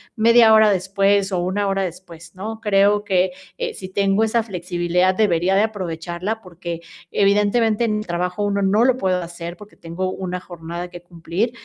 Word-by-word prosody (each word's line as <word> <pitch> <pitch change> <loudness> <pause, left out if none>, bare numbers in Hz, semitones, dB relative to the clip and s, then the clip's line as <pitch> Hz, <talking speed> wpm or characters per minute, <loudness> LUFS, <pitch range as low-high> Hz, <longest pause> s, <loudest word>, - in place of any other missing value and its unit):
1/2 230 0 +6
hora 220 -1 +6
después, 195 +1 +1
o 185 - 0
1 195 +3 -1
hora 195 0 0
después, 170 -2 -9
¿no? 220 +4 -6
Creo 205 0 +3
que, 185 -2 +1 0.3
eh, 485 -2 -3
si 185 - -8
tengo 200 +2 +1
esa 225 +1 +2
flexibilidad, 180 -2 0
debería 185 -3 +2
de 200 - +4
aprovecharla, 185 0 -4
porque 170 -3 -7 0.3
evidentemente, 210 +3 +2
en 215 -2 0
el 210 - -7
trabajo 180 +3 -2
1, 200 0 0
no 205 +4 +3
lo 255 -1 +4
puedo 185 -5 0
hacer, 170 0 -7
porque 210 -1 -14
tengo 180 +3 -4
una 180 -1 -4
jornada 175 0 -7
que 175 -1 -10
cumplir. 175 +6 -3
190 Hz, 175 wpm, -21 LUFS, 175-210 Hz, 0.3 s, 1/2